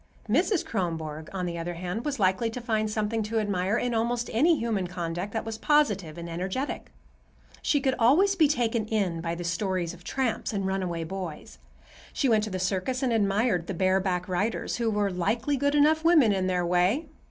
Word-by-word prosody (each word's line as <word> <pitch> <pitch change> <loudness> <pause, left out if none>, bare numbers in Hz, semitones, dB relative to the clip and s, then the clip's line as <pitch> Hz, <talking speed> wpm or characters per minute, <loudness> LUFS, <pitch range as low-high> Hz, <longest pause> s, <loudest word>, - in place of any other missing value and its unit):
Mrs. 335 - +2
Kronborg, 160 -6 -3
on 185 -2 -3
the 170 -1 -4
other 175 +1 -4
hand, 180 +7 -4
was 285 -4 -2
likely 190 +4 +2
to 225 - -5
find 220 -3 -1
something 215 +1 -1
to 215 +2 -2
admire 200 0 0
in 245 0 -1
almost 235 +1 -1
any 310 +8 +4
human 220 -7 -1
conduct 175 +2 -4
that 225 +1 -3
was 225 -1 -5
positive 205 - +2
and 170 0 -6
energetic. 185 +11 -4 0.7
She 290 - +2
could 265 -1 +1
always 340 +13 +4
be 320 -5 +5
taken 235 -5 0
in 195 -7 -1
by 165 0 -2
the 175 - -5
stories 180 0 -1
of 180 0 -14
tramps 255 -2 -2
and 195 -2 -1
runaway 185 -3 -2
boys. 160 - -7 0.5
She 275 - +1
went 220 -3 +3
to - - -5
the 185 - -3
circus 190 +8 -1
and 250 -3 +1
admired 200 -4 +1
the 195 - -3
bareback 185 0 +1
riders, 200 +5 -1
who 235 -2 0
were 205 -2 0
"likely 220 +10 0
good 285 +2 +1
enough 310 +2 +4
women 310 -11 +5
in 190 -1 0
their 180 -1 0
way." 180 - +2
205 Hz, 195 wpm, -27 LUFS, 180-240 Hz, 0.7 s, be